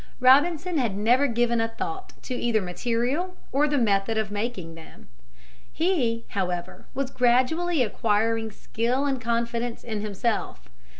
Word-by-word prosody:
Robinson 310 +6 +4
had 225 -6 0
never 245 +7 +4
given 235 -1 +1
a 225 - +1
thought 380 +12 -6
to 255 - -4
either 235 -3 +1
material 240 - -1 0.2
or 290 +3 +3
the 295 -1 +1
method 215 -2 +2
of 215 -2 -1
making 205 -6 -3
them. 165 - -14 0.6
He, 265 -10 0
however, 180 -2 -3
was 270 -1 -2
gradually 260 +6 +2
acquiring 225 0 0
skill 235 +6 -1
and 270 -3 -1
confidence 235 0 -2
in 220 -3 -3
himself. 215 +2 -2
235 Hz, 135 wpm, -25 LUFS, 220-270 Hz, 0.6 s, Robinson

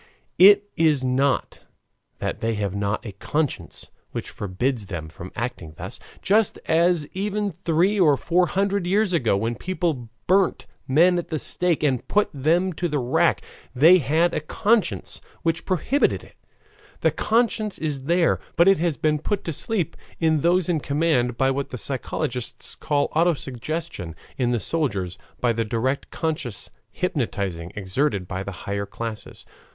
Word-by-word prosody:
It 200 +2 +8
is 155 -5 +3
not 130 +2 +1 0.6
that - - -3
they 115 0 -1
have 100 -2 -2
not 100 +3 -2
a 105 - -5
conscience 145 +9 -3 0.2
which - - -6
forbids 105 +3 -2
them 80 -5 -5
from 85 +3 -10
acting 110 -10 -5
thus, - - -7 0.2
just 210 +1 +3
as, 165 -1 +3
even 205 +1 -1
three 175 +4 +1
or 150 -6 +5
four 175 +4 +2
hundred 195 +1 0
years 200 +1 +2
ago, 120 - +2
when 115 +3 -1
people 160 -6 -2 0.2
burnt 190 0 +2 0.2
men 175 +6 +4
at 170 - -5
the 155 - -2
stake 175 +1 0
and 130 -5 +1
put 210 0 +2
them 170 +7 +1
to 175 +2 -1
the 150 -3 -1
rack 125 -2 +2 0.3
they 165 +8 +7
had 165 +4 +2
a - - 0
conscience 200 +5 0 0.2
which 165 0 -1
prohibited 190 - +1
it; - - -16 0.7
the - - +3
conscience 220 -2 +1
is 145 -4 -3
there, 170 +2 +3 0.2
but 170 - +5
it 195 -3 +5
has 170 -3 0
been 150 -1 +1
put 200 +6 -2
to 165 - -3
sleep 190 +1 -1 0.2
in 160 -2 +2
those 175 +2 +3
in 170 -3 +1
command 140 -5 +1
by 135 0 +3
what 140 +1 -2
the 125 - -5
psychologists 130 0 -3
call 145 -2 0
auto 170 +2 +4
suggestion; 135 - -5 0.2
in 125 -2 0
the 120 -1 +1
soldiers, 100 - -2 0.2
by 120 -1 +2
the 115 0 0
direct 120 +5 -1
conscious 155 -10 -4 0.2
hypnotizing 90 -4 -2
exerted 100 0 -1
by 95 0 -4
the 100 - -5
higher 100 0 -2
classes. 115 -2 -7
150 Hz, 160 wpm, -24 LUFS, 120-175 Hz, 0.7 s, It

